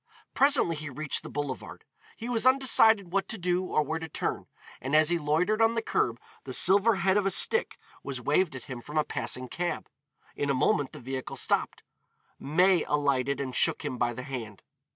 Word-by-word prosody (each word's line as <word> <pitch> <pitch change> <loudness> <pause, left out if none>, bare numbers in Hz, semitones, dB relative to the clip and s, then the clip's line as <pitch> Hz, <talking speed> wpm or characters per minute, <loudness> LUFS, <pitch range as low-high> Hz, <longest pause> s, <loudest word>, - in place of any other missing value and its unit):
Presently 270 - +3
he 150 0 -6
reached 145 +2 -3
the - - -10
boulevard. 145 -2 -6 0.3
He 230 - -7
was 245 0 +1
undecided 225 -8 +5
what 195 0 0
to 225 - -4
do 180 0 0
or 155 - +1
where 160 +3 -3
to 160 0 -7
turn, - - -3 0.3
and 135 +4 -1
as 155 0 +5
he 175 -1 +1
loitered 165 +9 0
on 225 +1 +3
the 230 - 0
curb 120 - -1 0.2
the 130 - -7
silver 200 +4 +4
head 190 +1 +1
of 200 -1 +1
a - - +3
stick 465 - +1 0.2
was 135 -2 -5
waved 150 +5 0
at 130 - -8
him 125 -2 -8
from 150 +5 -7
a 155 - +3
passing 130 -3 -3
cab; 175 +7 -4 0.5
in 145 - -2
a 140 - +1
moment 135 +1 +1
the - - -9
vehicle 130 +1 -6
stopped. - - -1 0.6
May 180 +4 +2
alighted 140 -2 0
and 130 -2 -4
shook - - +2
him 125 - -4
by 120 0 +1
the 125 - -7
hand. 115 -7 -7
155 Hz, 200 wpm, -28 LUFS, 135-195 Hz, 0.6 s, undecided